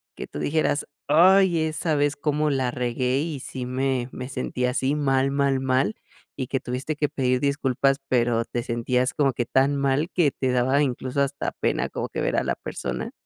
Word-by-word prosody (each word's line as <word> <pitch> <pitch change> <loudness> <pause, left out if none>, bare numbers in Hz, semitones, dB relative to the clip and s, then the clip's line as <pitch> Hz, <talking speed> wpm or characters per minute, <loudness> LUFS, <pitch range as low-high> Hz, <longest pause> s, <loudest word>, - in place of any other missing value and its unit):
que - - -7
tú - - -7
dijeras: 150 -1 0 0.2
"Ay, 180 +2 +5
esa 155 0 -1
vez 145 0 +1
cómo 150 +1 0
la 130 -3 0
regué 125 +1 -1
y 155 -1 -3
sí 125 -1 -6
me 130 -1 -1
me 125 0 -6
sentí 125 -1 -2
así, 130 +3 0
mal, 135 -2 +2
mal, 140 -1 +1
mal", 130 +9 +1 0.4
y 130 - -3
que 135 +1 -1
tuviste 130 +5 -4
que 150 -1 0
pedir 130 -1 0
disculpas, 135 -1 +1
pero 120 -2 +1
te 120 0 -3
sentías 125 +2 0
como 140 -3 +2
que 120 0 -2
tan 135 +4 +2
mal 140 +4 +1
que 160 -7 +2
te 130 0 -1
daba 130 +3 +2
incluso 130 0 -1
hasta 140 0 -1
pena - - -1
como - - -4
que - - -4
ver - - 0
a - - +2
la - - -1
persona? - - -5
135 Hz, 195 wpm, -24 LUFS, 125-145 Hz, 0.4 s, Ay